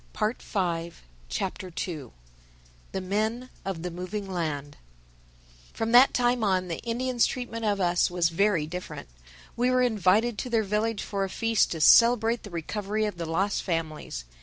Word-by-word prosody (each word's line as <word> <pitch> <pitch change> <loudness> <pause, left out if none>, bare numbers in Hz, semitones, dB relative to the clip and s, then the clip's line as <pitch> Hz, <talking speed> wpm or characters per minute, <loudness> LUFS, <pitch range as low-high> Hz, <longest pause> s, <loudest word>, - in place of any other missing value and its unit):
THE 215 +3 0
SECOND 170 -4 -2 0.4
CHAPTER 180 - -4 1.2
"THE 190 - -3
MEN 220 +6 -2
OF 185 -4 -4
THE 180 - -3
MOVING 185 +4 -5
LAND" 155 -6 -3 1.0
FROM 225 0 -2
that 250 +3 +8
time 245 -1 +1
on 185 -3 +1
the 165 - -3
Indians' 240 +1 0
treatment 230 -3 -4
of 205 -1 +1
us 175 -1 +2
was 175 -2 +1
very 170 -2 +2
different. 180 - -7 0.5
We 245 +1 +2
were 255 0 +3
invited 220 0 +2
to 250 - -4
their 225 -2 +2
village 210 +2 -1
for 200 -1 -2
a 195 - -2
feast 225 +2 +1
to 160 - -5
celebrate 230 +4 +6
the 205 - -10
recovery 205 +5 -2
of 210 -4 -4
the 170 - -3
lost 190 +5 0
families. 155 - -4
200 Hz, 160 wpm, -27 LUFS, 175-230 Hz, 1.2 s, that